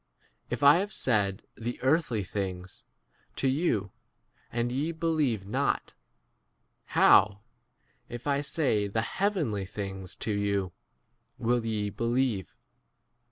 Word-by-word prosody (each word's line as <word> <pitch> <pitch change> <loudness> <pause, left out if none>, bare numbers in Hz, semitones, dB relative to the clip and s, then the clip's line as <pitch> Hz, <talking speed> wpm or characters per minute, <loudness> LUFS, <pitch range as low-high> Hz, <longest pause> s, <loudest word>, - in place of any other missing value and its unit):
If 120 +3 -3
I 145 +3 +8
have 200 +3 -2
said 105 -6 +1
the 120 +2 -4
earthly 130 -6 +2
things 95 -1 -5 0.5
to 135 - 0
you, 130 - +1 0.6
and 120 +1 -1
ye 145 +6 -1
believe 155 - 0
not, 130 +8 -1 1.0
how, 100 0 +6 0.7
if 120 0 -7
I 140 -1 +1
say 135 -9 +1
the 110 +3 -1
heavenly 150 - -1
things 95 -2 -6
to 110 - -3
you, 100 -2 0 0.7
13 - - -5
will 120 -1 +2
ye 105 -2 -1
believe 115 - -1
115 Hz, 115 wpm, -29 LUFS, 100-140 Hz, 1.0 s, I